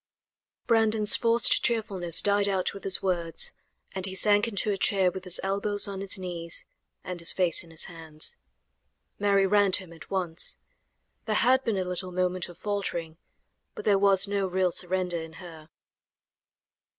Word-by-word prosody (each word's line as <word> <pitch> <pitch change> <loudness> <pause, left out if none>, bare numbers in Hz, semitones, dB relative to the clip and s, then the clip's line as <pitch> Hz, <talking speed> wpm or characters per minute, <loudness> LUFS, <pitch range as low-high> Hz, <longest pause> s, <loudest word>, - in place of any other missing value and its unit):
Brandon's 220 -2 +3
forced 230 0 +3
cheerfulness 195 -7 0
died 200 0 +2
out 190 -2 -1
with 200 - -10
his 190 -2 -1
words, 170 -3 -1 0.4
and 190 0 -1
he 190 - -6
sank 205 +2 +3
into 210 -1 +2
a - - 0
chair 190 -1 +2
with 190 +1 -8
his 180 -1 0
elbows 200 +1 +1
on 195 -1 -6
his 195 0 -2
knees 175 -3 -4 0.4
and 180 -1 -6
his 170 - +2
face 180 -3 +1
in 170 - -17
his 165 -1 -6
hands. 160 -3 -4 0.8
Mary 200 -1 +3
ran 205 0 +3
to 190 - +3
him 170 -2 -14
at 165 - -14
once. 180 -4 -2 0.7
There 215 - -1
had 260 +4 +3
been 225 -5 -1
a 190 - 0
little 180 0 +1
moment 180 0 0
of 175 - -13
faltering, 175 -6 -4 0.6
but - - -8
there 200 -2 +3
was 195 -1 +5
no 200 -1 -1
real 185 0 0
surrender 180 -1 0
in 160 0 -10
her. 165 -3 -12
190 Hz, 170 wpm, -27 LUFS, 175-205 Hz, 0.8 s, was